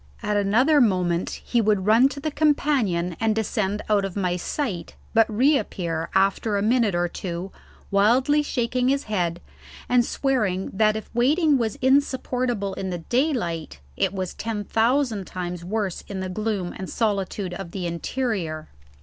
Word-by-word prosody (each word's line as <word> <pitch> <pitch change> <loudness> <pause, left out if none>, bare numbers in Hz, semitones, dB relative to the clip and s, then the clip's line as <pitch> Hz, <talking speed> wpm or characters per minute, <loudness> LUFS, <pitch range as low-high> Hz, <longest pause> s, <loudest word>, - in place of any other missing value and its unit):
At 210 -1 0
another 245 +9 +4
moment 180 -6 +1 0.2
he 240 - +2
would 210 -3 +1
run 230 +5 +5
to 280 - -7
the 310 +2 -3
companion 265 - +1
and 220 -1 +1
descend 210 -2 -1
out 210 -2 +2
of 195 -2 -4
my 180 -3 0
sight, 180 - -3 0.2
but 225 0 +4
reappear 205 - 0
after 195 +2 +2
a 200 - 0
minute 225 -3 +2
or 175 0 +1
two 175 +1 -5 0.4
wildly 250 +9 +4
shaking 250 -3 -1
his 275 +1 +1
head 175 -5 -1 0.5
and 245 -1 +4
swearing 215 -9 -1
that 215 +2 +3
if 220 - -6
waiting 285 +4 +3
was 220 -3 -1
insupportable 255 -6 +1
in 190 0 -4
the 180 - -3 0.2
daylight, 225 - 0 0.2
it - - +1
was 185 -2 -4
ten 220 -2 -4
thousand 225 -2 +1
times 180 -1 -5
worse 200 0 -2
in 195 -2 -5
the 185 0 -3
gloom 200 -2 -2
and 190 - -6
solitude 200 -3 -1
of 185 -1 -6
the 180 0 -5
interior. 170 -3 -3
210 Hz, 160 wpm, -24 LUFS, 185-250 Hz, 0.5 s, run